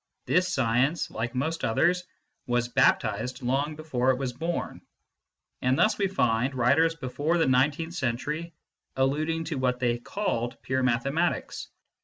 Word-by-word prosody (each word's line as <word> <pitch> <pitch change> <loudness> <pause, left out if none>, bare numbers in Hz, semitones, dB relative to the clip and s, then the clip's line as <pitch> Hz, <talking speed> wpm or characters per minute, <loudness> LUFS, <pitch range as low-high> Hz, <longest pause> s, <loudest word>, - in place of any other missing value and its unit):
This 180 0 +2
science, 130 +3 +1
like 120 +3 -4
most 160 +6 -2
others, 180 +10 +2 0.4
was 120 -1 +1
baptised 120 +1 +1
long 140 +5 0
before 135 -5 -1
it 130 - +3
was 130 -2 -3
born; 165 +6 -4 0.8
and 130 +1 +2
thus 215 0 +3
we 200 - +2
find 125 -7 +1
writers 140 +7 +3
before 150 +3 -1
the 165 - +3
nineteenth 145 +6 +1
century 150 +4 -2 0.4
alluding 155 +5 0
to 155 -4 -4
what 125 -1 0
they 120 -1 0
called 120 - -3
pure 130 0 0
mathematics. 135 +7 0
135 Hz, 140 wpm, -27 LUFS, 125-165 Hz, 0.8 s, it